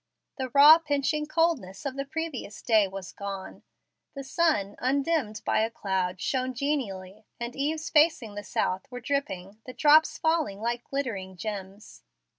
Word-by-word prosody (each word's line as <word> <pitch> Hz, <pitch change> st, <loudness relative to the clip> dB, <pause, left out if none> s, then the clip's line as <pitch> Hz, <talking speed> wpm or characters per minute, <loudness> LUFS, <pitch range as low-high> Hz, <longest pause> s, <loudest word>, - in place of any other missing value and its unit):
The 260 Hz, -1 st, -2 dB
raw, 295 Hz, +5 st, +8 dB
pinching 300 Hz, 0 st, -1 dB
coldness 310 Hz, -, 0 dB
of 270 Hz, -2 st, -3 dB
the 275 Hz, 0 st, -3 dB
previous 300 Hz, -7 st, -5 dB
day 220 Hz, -4 st, +4 dB
was 190 Hz, -1 st, -8 dB
gone. 195 Hz, -1 st, -7 dB, 0.5 s
The 275 Hz, -, -5 dB
sun, 265 Hz, -10 st, +1 dB
undimmed 270 Hz, -4 st, 0 dB
by -, -, +2 dB
a 220 Hz, +1 st, +1 dB
cloud, 190 Hz, -4 st, -2 dB
shone 255 Hz, +4 st, -1 dB
genially, 215 Hz, -8 st, -3 dB
and 235 Hz, 0 st, -5 dB
eaves 305 Hz, +3 st, -2 dB
facing 295 Hz, -8 st, +3 dB
the 205 Hz, -, -5 dB
south 190 Hz, +5 st, -2 dB
were 245 Hz, -1 st, -7 dB
dripping, 215 Hz, -7 st, -3 dB
the 255 Hz, -, -7 dB
drops 310 Hz, +3 st, +5 dB
falling 320 Hz, -11 st, 0 dB
like 235 Hz, +2 st, -2 dB
glittering 200 Hz, -10 st, -4 dB
gems. 200 Hz, +1 st, -7 dB
245 Hz, 150 wpm, -27 LUFS, 200-290 Hz, 0.5 s, raw